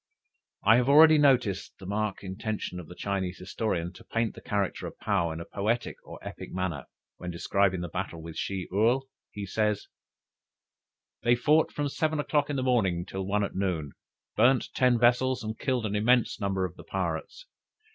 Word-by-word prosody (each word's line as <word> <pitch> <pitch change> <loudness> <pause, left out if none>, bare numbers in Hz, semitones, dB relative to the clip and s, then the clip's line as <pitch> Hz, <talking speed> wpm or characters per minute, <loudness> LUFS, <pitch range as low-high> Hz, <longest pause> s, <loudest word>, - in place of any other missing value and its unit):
I 110 +3 +6
have 125 +2 +2
already 155 +2 +8
noticed 125 -9 +2
the 95 - -11
marked 105 +1 -2
intention 95 -1 -4
of 85 - -9
the 90 - -11
Chinese 95 -3 -2
historian, 90 -2 -2
to - - -14
paint 115 -1 -1
the - - -12
character 100 -2 -2
of - - -10
Paou 95 -6 0
in 80 - -5
a 85 - -6
poetical 110 +4 -3
or - - -9
epic - - -8
manner. 90 -7 -3 0.3
When 90 - -6
describing 95 +2 +1
the 90 - -3
battle 90 -1 -4
with 80 0 -8
Shih 95 -2 -3
Url, 115 +7 +3 0.3
he 100 -1 -6
says: 105 +1 -1 1.3
"They 120 +1 +4
fought 150 +6 +3
from 145 -1 -2
seven 155 +2 -1
o'clock 145 0 +1
in 145 - -1
the 130 - -1
morning 95 -9 +1
till 95 -1 -5
one 105 +1 +1
at 100 - -3
noon, 85 -7 -2 0.4
burnt 125 +3 +4
ten 125 -2 +3
vessels, 125 +1 +3
and 110 +1 -5
killed 125 -4 0
an 105 -1 -2
immense 120 +2 +2
number 95 -1 0
of 90 - -7
the - - -10
pirates. 90 - -4
105 Hz, 185 wpm, -28 LUFS, 95-125 Hz, 1.3 s, already